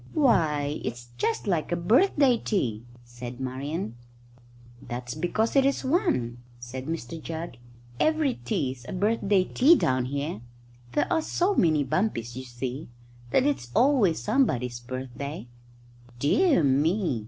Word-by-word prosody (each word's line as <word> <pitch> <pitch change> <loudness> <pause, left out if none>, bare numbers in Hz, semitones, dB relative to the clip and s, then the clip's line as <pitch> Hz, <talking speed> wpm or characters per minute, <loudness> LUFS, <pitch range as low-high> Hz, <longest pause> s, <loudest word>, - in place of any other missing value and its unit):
"Why, 155 - +2
it's 120 0 -5
just 230 - 0
like 175 -6 0
a - - +2
birthday 250 - +4
tea!" 120 - -2 0.2
said 120 +1 -9
Marian. 130 +1 -4 0.9
"That's 120 0 -5
because 180 - -1
it 275 - +6
is 275 0 0
one," 260 - 0 0.2
said 130 +3 -7
Mr 160 -1 -5
Jugg. 160 -5 -6 0.4
"Every 310 -4 +2
tea's 130 +1 -2
a - - -4
birthday 200 0 +2
tea 280 - +5
down 130 - +1
here. 140 -3 -3 0.5
There 145 - +2
are 320 - +2
so 360 +5 +1
many 155 - +3
bumpies, 130 - -1
you 130 0 -6
see, 125 +3 -5 0.4
that 255 - +3
it's 285 - -1
always 240 - +4
somebody's 125 - 0
birthday." 130 +4 -6 0.7
"Dear 220 - +3
me!" 145 - +2
155 Hz, 130 wpm, -26 LUFS, -, 0.9 s, it